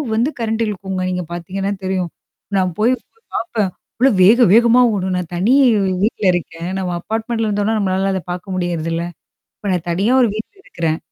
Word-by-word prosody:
வந்து 240 +6 +2
கரண்டிழுக்கும்ங்க. 210 -5 -2
நீங்க 180 -1 -2
பாத்தீங்கன்னா 190 +3 -3
தெரியும். 185 -2 -1 0.5
நான் 185 -1 +1
போய் 240 +4 +4 0.4
பாப்பேன். 220 -4 -1 0.3
அவ்ளோ 265 +3 +5
வேக 235 +5 +7
வேகமா 235 +2 +6
ஓடும் 190 -2 -1
நான் 180 -1 -4
தனி 205 +9 +2 0.5
வீட்ல 215 -1 -1
இருக்கேன். 170 0 -4
நம்ம 180 -2 -2
அபார்ட்மெண்டட்ல 225 +1 -2
இருந்தோம்ன்னா, 205 +1 0
நம்மளால 195 0 0
அத 190 - -1
பாக்க 180 +2 -5
முடியறதில்ல. 170 -2 -2 0.5
இப்ப 205 - -4
நான் 175 -1 -2
தனியா 200 +8 +1
ஒரு 240 - +4
வீட்ல 220 - -6
இருக்கிறேன். 160 -2 -2
195 Hz, 155 wpm, -18 LUFS, 180-225 Hz, 0.5 s, வேக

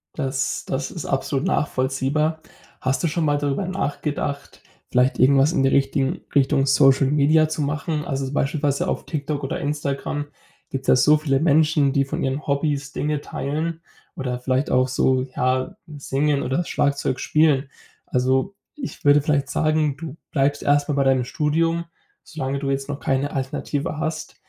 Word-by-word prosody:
Das 135 -2 -2
das 135 +3 -3
ist 170 - -6
absolut 135 +1 -1
nachvollziehbar. 145 +4 0 0.4
Hast 130 +5 0
du - - +3
schon 160 +1 -1
mal 145 -1 +2
darüber 145 +6 -1
nachgedacht, 145 -5 -3 0.3
vielleicht 125 +1 +2
irgendwas 135 +3 +5
in 135 - +2
die 135 - +4
richtigen 135 0 +1
Richtung 140 0 +3
Social 135 0 +5
Media 150 +2 +3
zu 155 -1 -3
machen? 150 +1 -2
Also 135 -4 -3
beispielsweise 140 0 0
auf - - -2
TikTok 145 -2 -3
oder 135 - -3
Instagram 145 0 -2 0.4
gibt's 135 -1 -5
ja - - +6
so 150 +4 +5
viele 140 -3 +1
Menschen, 150 -2 +3
die 140 -1 +2
von 135 - -3
ihren 135 +2 -2
Hobbys 140 -1 -1
Dinge 150 -1 -1
teilen 160 +4 -3 0.3
oder 125 -2 -3
vielleicht 130 +2 0
auch 130 0 +3
so, 130 0 +2
ja, 130 0 0 0.2
singen 140 +1 0
oder 135 +8 0
Schlagzeug 140 -3 0
spielen. 150 -3 +2 0.4
Also, 130 +9 0 0.2
ich 280 - -7
würde 145 0 +6
vielleicht 140 -2 0
sagen, 155 -1 +1
du 160 -3 -7 0.2
bleibst 145 0 +1
erstmal 145 0 +2
bei 140 - +3
deinem 130 -2 +3
Studium, 165 +4 0 0.4
solange 140 -3 -4
du 140 - -3
jetzt 135 +1 -3
noch 145 0 -4
keine 135 +2 0
Alternative 140 +3 -3
hast, 160 0 -4
140 Hz, 160 wpm, -22 LUFS, 135-150 Hz, 0.4 s, ja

